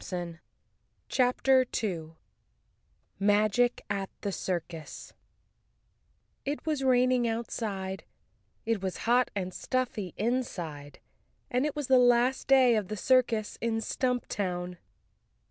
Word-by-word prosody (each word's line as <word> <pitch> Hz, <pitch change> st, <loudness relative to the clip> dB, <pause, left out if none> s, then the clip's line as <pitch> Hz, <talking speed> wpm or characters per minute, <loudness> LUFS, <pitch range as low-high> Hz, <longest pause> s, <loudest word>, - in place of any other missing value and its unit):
28 175 Hz, -2 st, -5 dB, 0.7 s
CHAPTER 260 Hz, +1 st, +3 dB
2 170 Hz, -10 st, -4 dB, 1.0 s
Magic 210 Hz, +4 st, +2 dB
at 200 Hz, -1 st, -2 dB
the 200 Hz, -, -2 dB
Circus 170 Hz, -4 st, -5 dB, 1.3 s
TT 285 Hz, +3 st, -4 dB
was 300 Hz, -4 st, -1 dB
raining 255 Hz, -1 st, +3 dB
outside, 210 Hz, -4 st, -3 dB, 0.6 s
it 225 Hz, -3 st, 0 dB
was 190 Hz, -2 st, -3 dB
hot 245 Hz, +2 st, +3 dB
and 185 Hz, -2 st, -3 dB
stuffy 240 Hz, -7 st, -2 dB
inside 175 Hz, -, -3 dB, 0.5 s
and 255 Hz, +4 st, +2 dB
it 300 Hz, -, -5 dB
was 295 Hz, -1 st, -2 dB
the 260 Hz, 0 st, +5 dB
last 245 Hz, +1 st, +3 dB
day 260 Hz, -3 st, +6 dB
of 210 Hz, -3 st, -1 dB
the 215 Hz, -, -5 dB
circus 235 Hz, -2 st, +2 dB
in 230 Hz, -1 st, 0 dB
Stumptown. 200 Hz, -8 st, -2 dB
225 Hz, 110 wpm, -29 LUFS, 190-250 Hz, 1.3 s, day